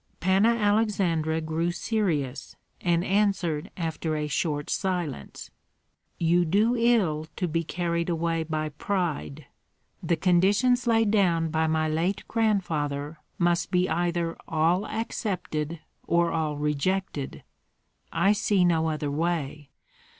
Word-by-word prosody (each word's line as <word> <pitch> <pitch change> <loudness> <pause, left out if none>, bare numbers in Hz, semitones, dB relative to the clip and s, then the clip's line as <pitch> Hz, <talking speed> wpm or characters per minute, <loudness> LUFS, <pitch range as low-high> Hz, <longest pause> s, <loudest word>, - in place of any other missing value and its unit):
Panna 195 +6 +3
Aleksandra 195 -7 +1
grew 160 +2 -1
serious, 170 - -2 0.3
and 170 -1 +2
answered 185 -6 +1
after 160 -2 -2
a 150 0 -1
short 150 -2 -1
silence: 175 - -3 0.7
"You 175 +1 +3
do 210 +8 +2
ill 210 -11 +2
to 180 - -1
be 165 +1 -1
carried 170 0 -2
away 165 -1 0
by 155 -1 -2
pride. 155 -3 -3 0.6
The 170 - +1
conditions 205 +9 +3
laid 225 -2 +3
down 170 -6 +2
by 160 0 +1
my 160 0 +1
late 165 +5 -1
grandfather 160 -9 -1 0.2
must 170 -1 +1
be 180 0 +2
either 170 0 -1
all 165 +5 +1
accepted 175 -8 -3 0.3
or 170 0 +2
all 155 -2 -1
rejected. 150 +1 -2 0.7
I 195 +5 +3
see 205 -3 +2
no 160 -2 +2
other 150 -2 -2
way. 150 -2 -2
170 Hz, 120 wpm, -26 LUFS, 155-195 Hz, 0.7 s, Panna